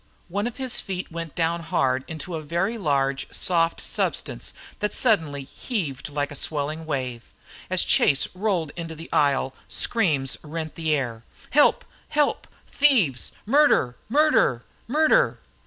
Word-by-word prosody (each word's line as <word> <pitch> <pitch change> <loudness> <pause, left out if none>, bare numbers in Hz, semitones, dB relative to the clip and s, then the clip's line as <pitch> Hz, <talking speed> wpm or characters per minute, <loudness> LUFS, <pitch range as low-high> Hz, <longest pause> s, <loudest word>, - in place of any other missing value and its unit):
One 205 +5 -1
of 245 - -7
his 260 -3 +3
feet 185 -3 -4
went 165 -2 -6
down 170 0 0
hard 130 -4 0
into 160 +2 -6
a 160 - -3
very 170 +8 -1
large, 140 -8 0
soft 165 -2 +1
substance - - -1 0.3
that 210 -1 -1
suddenly 160 - +2
heaved 150 - -4
like 145 0 -2
a - - -6
swelling 155 +2 -2
wave. 130 -5 -4 0.4
As 185 0 +3
Chase 140 -2 +4
rolled 180 -6 -1
into 165 -2 -6
the 165 +2 -10
aisle 140 -2 +2
screams 150 - +1
rent 160 +1 -5
the 160 -2 0
air. 120 -5 -3 0.3
"Help! 290 +1 +4 0.2
Help! 295 -1 +1 0.2
Thieves! 230 - +2
Murder! 230 - +4
Murder! 280 - +3 0.2
Murder!" 315 - +3
165 Hz, 140 wpm, -24 LUFS, 140-210 Hz, 0.4 s, Chase